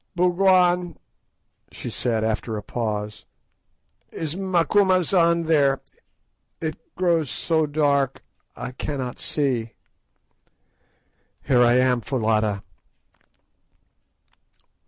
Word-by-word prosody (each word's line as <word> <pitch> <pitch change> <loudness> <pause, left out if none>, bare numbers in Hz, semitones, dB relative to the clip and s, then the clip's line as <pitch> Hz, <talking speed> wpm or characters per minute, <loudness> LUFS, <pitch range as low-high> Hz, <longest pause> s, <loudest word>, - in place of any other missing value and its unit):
"Bougwan," 180 -1 +3 0.7
she - - -7
said, 115 -3 -1
after 110 0 -2
a 105 - -6
pause, 105 -2 -4 0.9
"is 160 -1 -4
Macumazahn 185 -2 +2
there? 140 -4 +3 0.8
It 155 -2 -3 0.2
grows 170 -5 +1
so 160 +5 0
dark, 140 -2 0 0.3
I - - -6
cannot 130 -1 -5
see." 125 -6 -1 1.7
"Here 125 -3 +3
I 120 0 +5
am, 125 -1 +3
Foulata." 110 -4 0
145 Hz, 80 wpm, -23 LUFS, 120-170 Hz, 1.7 s, I